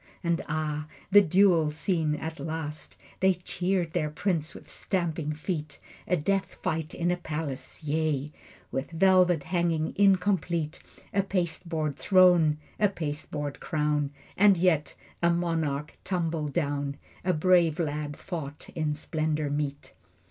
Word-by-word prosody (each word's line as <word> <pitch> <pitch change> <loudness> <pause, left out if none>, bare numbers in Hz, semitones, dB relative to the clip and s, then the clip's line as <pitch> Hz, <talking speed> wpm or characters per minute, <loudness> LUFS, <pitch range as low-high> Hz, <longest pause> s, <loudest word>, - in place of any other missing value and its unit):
And 170 -1 +1
ah, 150 -1 -2 0.2
the 205 +1 +9
duel 180 -3 +4
scene 155 0 0
at 160 +1 -5
last! 155 0 -5 0.2
They 190 0 +4
cheered 180 -1 -1
their 155 -4 0
prince 160 0 -1
with - - -12
stamping 165 -5 -2
feet. 150 -1 -4 0.3
A 180 - +2
death 195 +5 0
fight 160 -1 -2
in 175 0 +1
a 180 - 0
palace! 155 -3 -5
Yea, 150 -1 0 0.4
With 135 - -3
velvet 180 -2 +4
hangings 170 -2 0
incomplete, 180 -5 +2 0.3
A 200 - +3
pasteboard 170 -5 -2
throne, 175 -5 +5 0.2
a 210 - +4
pasteboard 150 -4 -4
crown, 150 -2 0 0.3
And 200 -1 +6
yet 165 -4 +2 0.3
a 170 - +4
monarch 165 -4 -1
tumbled 165 -5 -1
down, 145 -3 -1 0.3
A 185 - +2
brave 170 -1 +4
lad 150 -3 -2
fought 150 -5 -6
in 155 -2 -1
splendor 155 -1 -1
meet. 145 -1 -3
160 Hz, 130 wpm, -28 LUFS, 150-180 Hz, 0.4 s, the